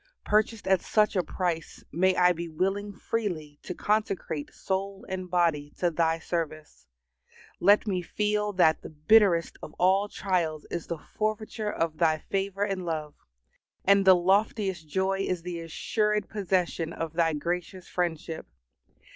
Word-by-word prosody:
Purchased 215 Hz, 0 st, +1 dB
at 190 Hz, -2 st, +4 dB
such 215 Hz, -1 st, +2 dB
a 185 Hz, -, +3 dB
price, 175 Hz, -3 st, -3 dB
may 185 Hz, +2 st, +3 dB
I 180 Hz, 0 st, +5 dB
be 170 Hz, -1 st, -4 dB
willing 195 Hz, +5 st, -1 dB
freely 180 Hz, -9 st, -4 dB
to 180 Hz, -, -6 dB
consecrate 200 Hz, -8 st, -1 dB
soul 195 Hz, +1 st, -3 dB
and 185 Hz, -1 st, -5 dB
body 165 Hz, -5 st, +1 dB
to 175 Hz, -1 st, +1 dB
Thy 165 Hz, 0 st, +1 dB
service. 155 Hz, -, -5 dB, 0.7 s
Let 205 Hz, +5 st, +5 dB
me 190 Hz, -4 st, -1 dB
feel 210 Hz, +4 st, -1 dB
that 160 Hz, -4 st, +4 dB
the -, -, -8 dB
bitterest 170 Hz, +2 st, +3 dB
of 150 Hz, -, -9 dB
all 195 Hz, +3 st, +2 dB
trials 170 Hz, -7 st, -1 dB
is 170 Hz, -, -4 dB
the 170 Hz, -, -3 dB
forfeiture 215 Hz, +3 st, -3 dB
of 160 Hz, -4 st, -2 dB
Thy 160 Hz, -2 st, +3 dB
favor 195 Hz, +4 st, -2 dB
and 195 Hz, -3 st, -2 dB
love, 155 Hz, -3 st, -3 dB, 0.7 s
and 200 Hz, 0 st, +5 dB
the 190 Hz, -1 st, +8 dB
loftiest 190 Hz, -1 st, +1 dB
joy 190 Hz, +3 st, 0 dB
is 185 Hz, -3 st, -1 dB
the 175 Hz, -1 st, -4 dB
assured 210 Hz, +5 st, -1 dB
possession 180 Hz, -4 st, -1 dB
of 165 Hz, -1 st, -4 dB
Thy 165 Hz, -1 st, +2 dB
gracious 175 Hz, +4 st, -3 dB
friendship. 165 Hz, -2 st, -3 dB
180 Hz, 145 wpm, -28 LUFS, 165-200 Hz, 0.7 s, the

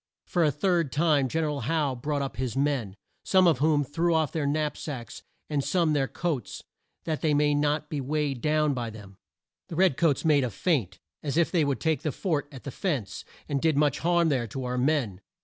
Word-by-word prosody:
For 175 Hz, -, +1 dB
a 155 Hz, -, +4 dB
third 165 Hz, 0 st, 0 dB
time 150 Hz, -3 st, +2 dB
Gen 160 Hz, +6 st, 0 dB
er -, -, 0 dB
al 145 Hz, -1 st, -3 dB
Howe 145 Hz, +2 st, 0 dB
brought 145 Hz, +3 st, -2 dB
up 135 Hz, -, -5 dB
his 130 Hz, -1 st, -3 dB
men, 135 Hz, -9 st, 0 dB, 0.3 s
some 185 Hz, -1 st, +4 dB
of 160 Hz, -7 st, +4 dB
whom 150 Hz, 0 st, +3 dB
threw 165 Hz, +5 st, 0 dB
off 160 Hz, -3 st, +1 dB
their 155 Hz, -3 st, -1 dB
knap 150 Hz, +1 st, 0 dB
sacks 125 Hz, -7 st, -7 dB, 0.3 s
and 145 Hz, -2 st, -1 dB
some 160 Hz, +2 st, +1 dB
their 135 Hz, -2 st, +1 dB
coats 160 Hz, -6 st, -3 dB, 0.4 s
that 160 Hz, -2 st, -3 dB
they 150 Hz, -2 st, +2 dB
might 145 Hz, 0 st, +3 dB
not 150 Hz, +1 st, 0 dB
be 150 Hz, -2 st, -3 dB
weighed 140 Hz, -2 st, -1 dB
down 150 Hz, -1 st, +2 dB
by 120 Hz, -3 st, -3 dB
them. 100 Hz, -3 st, -12 dB, 0.5 s
The 165 Hz, -, -7 dB
red 180 Hz, -5 st, +3 dB
coats 165 Hz, -3 st, +2 dB
made 145 Hz, -3 st, +4 dB
a 125 Hz, -, -1 dB
feint 115 Hz, -, -1 dB, 0.2 s
as 145 Hz, 0 st, -2 dB
if 170 Hz, -, +3 dB
they 170 Hz, -4 st, +3 dB
would 140 Hz, -5 st, 0 dB
take 160 Hz, -4 st, 0 dB
the 155 Hz, -, -1 dB
fort 155 Hz, -2 st, -2 dB
at 130 Hz, -3 st, -11 dB
the 140 Hz, -, -6 dB
fence, 140 Hz, -, -3 dB, 0.2 s
and 140 Hz, -2 st, -1 dB
did 160 Hz, -3 st, +2 dB
much 145 Hz, -2 st, +2 dB
harm 170 Hz, -1 st, +2 dB
there 125 Hz, -5 st, 0 dB
to 130 Hz, +5 st, -5 dB
our 125 Hz, 0 st, -2 dB
men. 125 Hz, -9 st, 0 dB
145 Hz, 220 wpm, -27 LUFS, 135-160 Hz, 0.5 s, a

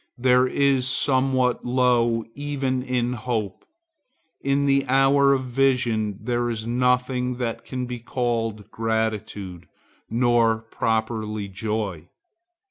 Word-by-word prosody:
There 125 Hz, +1 st, +4 dB
is 135 Hz, -1 st, +2 dB
somewhat 130 Hz, -2 st, +1 dB
low 120 Hz, -2 st, +2 dB
even 140 Hz, -3 st, -2 dB
in 125 Hz, -1 st, -1 dB
hope. 110 Hz, -5 st, -3 dB, 0.7 s
In 140 Hz, +1 st, +1 dB
the 140 Hz, -1 st, +3 dB
hour 135 Hz, +1 st, +4 dB
of 135 Hz, -1 st, +1 dB
vision 125 Hz, -5 st, +1 dB
there 120 Hz, +2 st, -1 dB
is 110 Hz, -2 st, -4 dB
nothing 125 Hz, +1 st, +1 dB
that 120 Hz, -2 st, -4 dB
can 125 Hz, -1 st, -4 dB
be 125 Hz, -1 st, -6 dB
called 115 Hz, -3 st, -2 dB
gratitude, 110 Hz, -5 st, -3 dB, 0.4 s
nor 115 Hz, -1 st, +3 dB
properly 110 Hz, -2 st, -2 dB
joy. 100 Hz, -4 st, -4 dB
120 Hz, 110 wpm, -24 LUFS, 110-130 Hz, 0.7 s, There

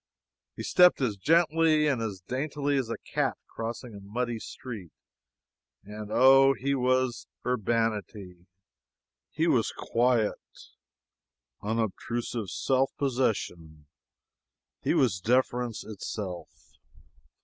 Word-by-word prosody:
He -, -, -6 dB
stepped 180 Hz, 0 st, +5 dB
as 125 Hz, -6 st, 0 dB
gently 160 Hz, -, +3 dB
and 135 Hz, -6 st, +1 dB
as 100 Hz, -5 st, -4 dB
daintily 140 Hz, -, -2 dB
as 130 Hz, -4 st, -1 dB
a 115 Hz, -, -3 dB
cat -, -, -2 dB
crossing 115 Hz, +1 st, -6 dB
a 100 Hz, -, -9 dB
muddy 115 Hz, +4 st, -3 dB
street; 110 Hz, -7 st, -8 dB, 0.9 s
and 105 Hz, +1 st, -8 dB
oh, 135 Hz, +3 st, +6 dB
he 140 Hz, +2 st, -1 dB
was 130 Hz, -3 st, 0 dB, 0.2 s
urbanity; 105 Hz, -6 st, -2 dB, 0.8 s
he -, -, -1 dB
was -, -, +2 dB
quiet, 120 Hz, -2 st, +1 dB, 1.2 s
unobtrusive 115 Hz, 0 st, -2 dB
self 135 Hz, 0 st, +1 dB
possession; 95 Hz, -, -2 dB, 1.0 s
he -, -, +1 dB
was 90 Hz, -, +2 dB
deference 120 Hz, +2 st, 0 dB
itself! 100 Hz, -3 st, -6 dB
120 Hz, 100 wpm, -28 LUFS, 105-130 Hz, 1.2 s, oh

